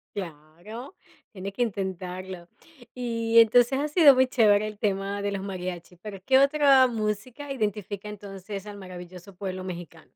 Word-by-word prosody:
Claro, 180 - -8 0.4
tiene 195 0 -6
que 245 +5 0
intentarlo. 185 -3 -5 0.5
Y 230 -2 +2
entonces, 245 +4 +5
ha 300 - 0
sido 300 -2 +7
muy 260 0 +3
chévere 215 -4 +3
el 210 -1 -8
tema 200 -1 -2
de 205 - -1
los 195 - -3
mariachis, 180 -2 -6
pero 205 -2 -7
¿qué 260 +3 +4
otra 275 -1 +5
música 230 +4 -3
identifica 210 -3 -3
entonces, 200 0 -8
al 205 -1 -8
maravilloso 185 0 -10
pueblo 185 -1 -5
mexicano? 170 -3 -9
205 Hz, 150 wpm, -26 LUFS, 185-235 Hz, 0.5 s, sido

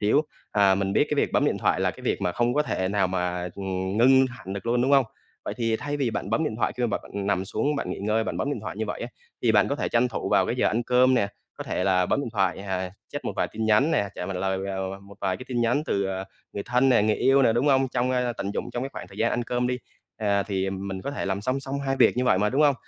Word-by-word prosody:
xíu, 110 +9 +3 0.3
à, 100 -2 +5
mình 95 0 -1
biết - - +4
cái - - +2
việc - - +1
bấm - - +3
điện - - +1
thoại - - +1
là - - +2
cái - - -13
việc - - -1
mà 90 - 0
không 120 +4 +1
có 150 - +3
thể 95 -10 -1
nào 100 -1 +2
mà, 90 -1 -2
ừn, 95 0 -3
ngưng 130 +2 +6
hẳn 105 -7 -8
được 100 +2 -6
luôn, 120 +1 +2
đúng 130 - +1
hông? 135 -2 +6 0.4
Vậy - - -4
thì 115 -2 0
thay 145 +4 -3
vì 135 -5 0
bạn 105 - -4
bấm 150 +9 +1
điện 110 - -2
thoại - - 0
khi 125 - -2
bạn - - -3
bạn 100 -1 -5
nằm 95 -2 +1
xuống 145 +9 -1
bạn 90 - -3
nghỉ - - -4
ngơi, 110 +2 0
bạn - - -3
bấm 140 - -1
điện 120 - -3
thoại 105 - -6
như 110 - -1
vậy - - -4
á, 120 - -4 0.3
thì 115 - +3
bạn 105 -1 +4
có 140 - 0
thể - - -1
tranh 120 +1 +2
thủ - - -4
vào - - +3
cái - - -1
giờ - - +2
ăn 115 +3 +1
cơm 125 +2 +4
nè, 100 -5 +2 0.3
có - - -6
thể 90 - -2
là 90 -2 +3
bấm - - +1
điện 140 - -3
thoại, 95 -4 +1
à, 95 -2 -3 0.2
check - - -5
một - - -2
vài - - 0
tin 110 - -3
nhắn 110 +8 +4
nè, 100 - +1
trả 90 - -5
mà 95 - -4
lời, 95 +1 -1
ờ, 95 0 -4
một 100 +1 -14
vài 95 -2 0
cái - - -9
tin 120 -2 -1
nhắn 120 +5 +2
từ, 100 0 0
à, 95 0 -3 0.3
người 100 - -4
thân 125 +2 +2
nè, 120 -5 +5
người 110 0 +2
yêu 135 +1 +4
nè, 115 - +4
đúng 120 +5 +1
hông? 135 -2 +4
Trong, 125 0 0
a, 125 -1 0
tận 100 -4 -4
dụng - - -3
trong 120 - -3
cái 135 - -3
khoảng - - -8
thời 100 - -13
gian 115 - +2
ăn 120 - 0
cơm 125 +1 -1
đi, 125 0 -1 0.4
à, 100 -2 +1
thì 95 -2 -2
mình 95 0 -5
có 140 - -3
thể 140 - -4
làm 95 0 -1
song 130 +6 -1
song 140 +1 -4
hai 135 - 0
việc - - +4
như 125 - +1
vậy 105 - +3
mà, 105 +2 +2
đúng 140 +4 +2
hông? 145 -2 +5
110 Hz, 310 wpm, -25 LUFS, 95-125 Hz, 0.4 s, ngưng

